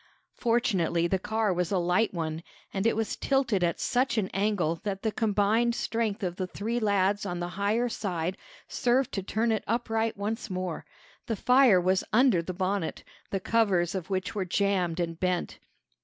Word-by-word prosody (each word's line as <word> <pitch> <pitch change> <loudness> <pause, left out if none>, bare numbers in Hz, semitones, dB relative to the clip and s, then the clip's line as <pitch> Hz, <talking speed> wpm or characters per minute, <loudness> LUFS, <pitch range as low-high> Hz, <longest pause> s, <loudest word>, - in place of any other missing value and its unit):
Fortunately, 195 -8 +1
the 190 +2 +1
car 220 -1 0
was 180 -1 -1
a 195 - +2
light 180 +5 +2
one, 160 -2 -3 0.3
and 195 +3 +1
it - - +2
was 220 -1 -1
tilted 250 -9 +1
at 170 -1 0
such 255 0 +1
an 200 -3 0
angle 195 -5 0
that 195 -2 -4
the 220 - +1
combined 220 +2 +2
strength 225 -4 -2
of 180 -1 -2
the 185 - -2
three 225 +6 -2
lads 200 -2 +1
on 180 -3 -3
the 175 0 -3
higher 205 +6 0
side 185 -6 -2 0.3
served 250 +1 +1
to 195 - -2
turn 220 +4 0
it 220 - 0
upright 225 -1 0
once 220 +4 -3
more. 185 -3 -4 0.4
The 225 - -1
fire 250 -3 +5
was 185 +1 +2
under 230 -5 +4
the 170 - -5
bonnet, 185 -1 -2 0.3
the 195 - -1
covers 190 -5 +2
of 190 -1 -4
which 185 -1 -2
were 200 - -1
jammed 185 -2 0
and 165 -1 -2
bent. 180 -1 -1
200 Hz, 180 wpm, -28 LUFS, 180-225 Hz, 0.4 s, fire